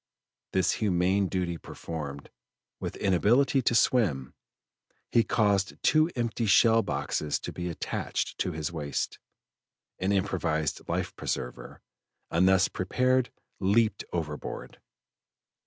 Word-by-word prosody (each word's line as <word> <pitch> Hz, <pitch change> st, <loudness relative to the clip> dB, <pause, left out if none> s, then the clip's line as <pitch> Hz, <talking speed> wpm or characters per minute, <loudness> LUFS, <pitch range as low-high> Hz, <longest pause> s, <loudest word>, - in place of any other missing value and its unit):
This 95 Hz, -1 st, +3 dB
humane 95 Hz, 0 st, +2 dB
duty 90 Hz, -2 st, -2 dB
performed, 70 Hz, -4 st, -7 dB, 0.5 s
with -, -, -4 dB
inability 120 Hz, +9 st, +3 dB
to 120 Hz, -, +1 dB
swim, 90 Hz, -, +2 dB, 0.8 s
he 115 Hz, -, +5 dB
caused 100 Hz, -2 st, +1 dB
two 155 Hz, +1 st, +4 dB
empty 115 Hz, -1 st, -1 dB
shell 115 Hz, +3 st, +6 dB
boxes 75 Hz, -8 st, -1 dB
to -, -, -7 dB
be 90 Hz, 0 st, -4 dB
attached 85 Hz, -, -3 dB
to 90 Hz, -, 0 dB
his 80 Hz, -1 st, -3 dB
waist, 75 Hz, -4 st, -3 dB, 0.8 s
an 95 Hz, +2 st, 0 dB
improvised 90 Hz, -6 st, -1 dB
life -, -, -2 dB
preserver, 60 Hz, 0 st, -5 dB, 0.5 s
and 90 Hz, +3 st, +4 dB
thus 95 Hz, -1 st, +4 dB
prepared 125 Hz, +6 st, +1 dB, 0.3 s
leaped 105 Hz, +2 st, +2 dB
overboard. 75 Hz, -4 st, -5 dB
95 Hz, 110 wpm, -28 LUFS, 85-115 Hz, 0.8 s, shell